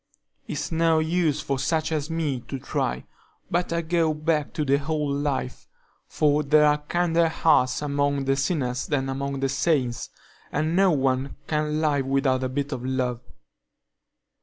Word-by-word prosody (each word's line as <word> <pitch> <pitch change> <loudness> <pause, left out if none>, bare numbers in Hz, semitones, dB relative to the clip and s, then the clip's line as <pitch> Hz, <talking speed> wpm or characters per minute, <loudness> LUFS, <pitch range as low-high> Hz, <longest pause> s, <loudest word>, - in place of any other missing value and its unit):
"It's 145 +2 -4
no 165 0 +3
use 160 -2 +1
for 135 -2 -2
such 155 +4 0
as 155 -1 -2
me 155 -5 -1
to 135 - -4
try; 130 - -2 0.5
better 170 -1 0
go 165 -1 +1
back 155 -1 0
to 155 -2 -1
the 140 +1 +2
old 150 -2 -1
life, 140 -3 -3 0.4
for 150 0 +2
there 150 +1 +4
are 150 0 +3
kinder 170 +2 +1
hearts 150 -5 +2
among 140 -1 0
the 135 0 +2
sinners 135 -4 -1
than 135 -2 -1
among 140 0 -3
the 135 - +1
saints, 135 -4 0 0.4
and 155 +3 0
no 195 +1 +5
one 135 -3 0
can 150 0 -1
live 145 -4 +1
without 135 -1 +1
a 130 - -1
bit 140 +2 -3
of 130 -3 -4
love. 125 -2 -1
145 Hz, 160 wpm, -25 LUFS, 135-160 Hz, 0.5 s, no